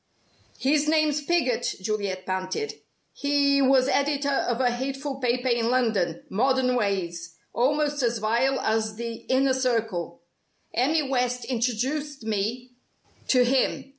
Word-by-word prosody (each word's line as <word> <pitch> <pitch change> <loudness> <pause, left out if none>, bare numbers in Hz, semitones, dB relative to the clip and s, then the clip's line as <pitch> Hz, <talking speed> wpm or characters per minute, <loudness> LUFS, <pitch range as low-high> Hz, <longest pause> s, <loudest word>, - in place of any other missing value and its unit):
"His 290 +2 +2
name's 305 -1 +2
Piggott," 295 -6 0
Juliet 190 -2 -3
panted. 185 - -3 0.4
"He 280 -1 +2
was 265 -1 +4
editor 280 0 +1
of 240 -3 0
a 250 -2 +2
hateful 270 +3 -4
paper 250 0 0
in 235 -2 +1
London 215 -10 0
Modern 255 +3 +1
Ways 175 -6 -2 0.2
almost 290 +3 +1
as 235 -1 +1
vile 235 +5 +1
as 220 -1 0
the 235 +1 -4 0.2
Inner 265 +1 +3
Circle. 225 -10 -2 0.5
Emmy 295 +6 +2
West 250 -1 -1
introduced 260 +4 -2
me 220 +4 -2 0.6
to 250 -2 +4
him. 260 +1 0
250 Hz, 125 wpm, -25 LUFS, 220-275 Hz, 0.6 s, was